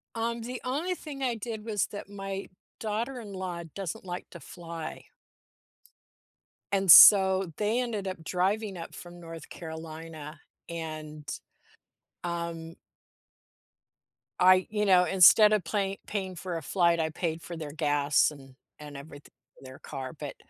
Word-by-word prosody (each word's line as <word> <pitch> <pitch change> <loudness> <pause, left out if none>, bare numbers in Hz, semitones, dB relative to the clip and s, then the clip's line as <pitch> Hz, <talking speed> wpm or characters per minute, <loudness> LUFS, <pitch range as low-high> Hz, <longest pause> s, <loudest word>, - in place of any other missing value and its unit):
Um, 230 +1 -2
the 245 +2 -6
only 305 +9 -2
thing 290 -5 -9
I 250 -3 0
did 220 -1 -6
was 210 -4 0
that 200 -1 -9
my 195 -1 -6 0.3
daughter-in-law 210 -6 -4
doesn't 190 -2 -5
like 180 0 -6
to - - -10
fly. 165 -2 -8 1.7
And, 195 -2 +4
so, 190 -2 +9
they 215 +3 +1
ended 215 -5 -3
up 185 -4 -6
driving 195 +4 -1
up 165 - -8
from 175 0 -11
North 165 -2 -10
Carolina 160 -1 -8 0.3
and, 155 -3 -7 1.0
um 170 -1 -4 1.6
I 185 0 +5
you 210 0 0
know, 180 -2 +5
instead 195 +4 +7
of 210 -3 +1
play 195 +2 -2
paying 190 -3 -4
for 175 0 -4
a - - -5
flight, 170 +2 +2
I 160 -1 0
paid 160 0 -3
for 170 0 -8
their 155 -2 -6
gas 145 0 +2
and 135 -3 -14 0.4
everyth 145 +1 -11 0.3
their 130 0 -12
car, 135 -1 -7
but, 145 -2 -6
180 Hz, 135 wpm, -28 LUFS, 160-205 Hz, 1.7 s, so